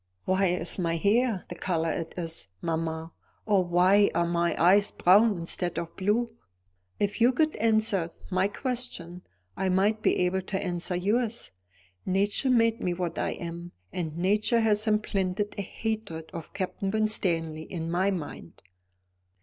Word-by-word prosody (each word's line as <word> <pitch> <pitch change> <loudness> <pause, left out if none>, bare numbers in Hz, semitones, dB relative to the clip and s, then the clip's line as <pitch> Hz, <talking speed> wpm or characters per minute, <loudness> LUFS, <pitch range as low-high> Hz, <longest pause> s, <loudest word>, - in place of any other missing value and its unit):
"Why 190 +1 +2
is 175 +1 -1
my 165 -2 0
hair 215 +2 +2
the - - -6
colour 165 -2 -1
it 165 - -4
is, 165 -2 -3
mamma, 160 - -3 0.3
or 200 -3 +3
why 180 +4 +4
are 170 0 +2
my 170 0 0
eyes 195 +4 +5
brown 205 +3 +4
instead 175 +1 -2
of 170 -1 -4
blue? 225 +4 0 0.6
If 205 +2 -1
you 240 +2 +6
could 310 +4 +1
answer 215 -5 +2 0.2
my 185 +1 +2
question, 220 - -4 0.3
I 190 - -1
might 205 +4 +2
be - - +2
able 190 +1 0
to 190 +1 -3
answer 180 -2 -2
yours. 220 +5 -1 0.5
Nature 200 +7 +1
made 230 -1 +3
me 175 -1 -1
what 175 -2 -3
I - - -1
am, 170 0 -7 0.2
and 160 -3 -4
nature 210 +6 +2
has 215 -1 +2
implanted 205 -2 0
a - - +1
hatred 200 -5 -4
of 165 -2 -7
Captain 190 0 -3
Winstanley 170 -7 0
in 165 -2 -4
my 185 +3 +2
mind." 155 - -6
190 Hz, 150 wpm, -27 LUFS, 170-215 Hz, 0.6 s, you